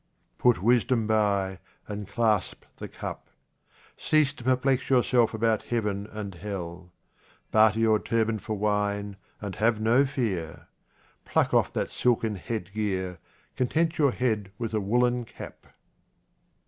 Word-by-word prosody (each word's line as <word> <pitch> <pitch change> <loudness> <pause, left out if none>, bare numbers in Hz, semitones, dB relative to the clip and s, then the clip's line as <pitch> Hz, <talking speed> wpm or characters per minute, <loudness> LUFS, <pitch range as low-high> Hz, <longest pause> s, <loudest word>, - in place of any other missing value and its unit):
Put 120 -7 +3
wisdom 120 0 +3
by, 100 -3 +1 0.3
and 105 -1 -5
clasp 105 -2 0
the - - -6
cup. - - -7 0.7
Cease 155 -2 +2
to 125 - -12
perplex 130 +1 +1
yourself 125 -2 +3
about 110 -1 +1
heaven 105 -4 -2
and 105 -3 -6
hell. 90 -2 -7 0.6
Barter 110 0 +4
your 110 -1 +4
turban 115 -1 0
for 110 -1 -4
wine 105 -1 -1 0.3
and 100 -2 -4
have 110 0 +2
no 120 +6 +3
fear. 105 - -3 0.6
Pluck - - +1
off - - +3
that - - -2
silken 115 -3 +1
headgear 95 -3 -3 0.2
— - - -36
content 160 +6 0
your 145 -2 +5
head 110 -6 -1
with 115 -2 -4
a 110 - +1
woollen 120 +4 +1
cap. 115 - -11
110 Hz, 135 wpm, -27 LUFS, 100-120 Hz, 0.7 s, your